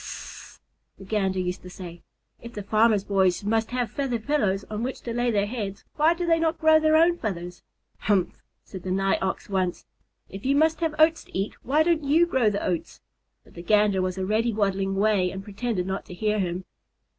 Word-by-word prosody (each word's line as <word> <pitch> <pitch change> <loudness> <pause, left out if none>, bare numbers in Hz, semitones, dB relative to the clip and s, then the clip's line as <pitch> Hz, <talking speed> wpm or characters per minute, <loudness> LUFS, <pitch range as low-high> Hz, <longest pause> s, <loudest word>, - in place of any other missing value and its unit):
"Sssss!" - - -9 0.4
the - - -12
Gander 190 -2 0
used 180 0 -3
to 180 - -10
say, 175 -2 -9 0.4
"if 235 0 -10
the 205 - -6
farmer's 215 0 +3
boys 190 -2 +1
must 220 +2 0
have 245 -3 -2
feather 270 -4 -1
pillows 215 -6 0
on 215 0 -4
which 255 +2 -4
to 235 - -5
lay 240 +1 0
their 205 -3 +1
heads, 205 -3 -5
why 315 +3 +3
do 350 +1 -3
they 330 -1 +3
not 325 0 0
grow 315 -1 +5
their 310 0 +3
own 340 +2 +4
feathers?" 180 -5 -5 0.4
"Humph!" 195 -4 0 0.2
said 190 - -9
the 185 - -6
Nigh 195 +1 +1
Ox 190 - -2
once; 185 -3 -2 0.4
"If 195 +1 -9
you 275 +2 +2
must 315 +2 +3
have 320 -2 -1
oats 315 +1 +4
to - - -7
eat, 195 +2 -2
why 295 +5 +2
don't 330 -2 +1
you 310 +5 +4
grow 260 -9 +2
the 205 -1 -3
oats?" 175 -3 -3 0.4
But - - -21
the 170 - -9
Gander 205 0 +3
was 185 0 -2
already 215 +5 0
waddling 195 -2 0
away 200 -2 +2
and 190 +1 -7
pretended 205 -2 -3
not 190 +1 -4
to 180 - -10
hear 210 +2 0
him. 180 -1 -2
210 Hz, 210 wpm, -25 LUFS, 190-265 Hz, 0.4 s, grow